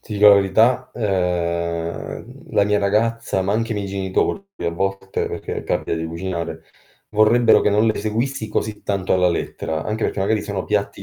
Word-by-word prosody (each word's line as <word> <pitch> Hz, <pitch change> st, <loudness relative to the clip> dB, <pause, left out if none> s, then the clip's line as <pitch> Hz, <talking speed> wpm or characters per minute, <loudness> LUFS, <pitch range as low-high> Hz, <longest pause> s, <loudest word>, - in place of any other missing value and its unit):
Ti 110 Hz, -, -10 dB
dico 105 Hz, 0 st, +6 dB
la 100 Hz, -, +9 dB
verità? 110 Hz, +6 st, +3 dB
Ehm, 90 Hz, -, -2 dB
la 100 Hz, -, +4 dB
mia 105 Hz, 0 st, +2 dB
ragazza, 105 Hz, 0 st, 0 dB
ma 100 Hz, -, 0 dB
anche 115 Hz, +2 st, 0 dB
i -, -, -3 dB
miei 100 Hz, -1 st, -3 dB
genitori 95 Hz, -, -1 dB, 0.2 s
a 85 Hz, -, -1 dB
volte, 95 Hz, +2 st, -2 dB
perché -, -, -5 dB
capita -, -, -1 dB
di 80 Hz, 0 st, -3 dB
cucinare, 85 Hz, 0 st, -4 dB, 0.5 s
vorrebbero 110 Hz, +2 st, +5 dB
che -, -, +2 dB
non 105 Hz, +2 st, +3 dB
le 110 Hz, -, +1 dB
seguissi 110 Hz, +3 st, -2 dB
così 110 Hz, -1 st, -3 dB
tanto 95 Hz, -2 st, -1 dB
alla 90 Hz, -1 st, +4 dB
lettera, 80 Hz, -2 st, -3 dB
anche 110 Hz, +1 st, -2 dB
perché, 95 Hz, -, -1 dB
magari 105 Hz, +2 st, +1 dB
sono 100 Hz, -3 st, -4 dB
piatti 100 Hz, -1 st, -1 dB
100 Hz, 180 wpm, -21 LUFS, 95-110 Hz, 0.5 s, la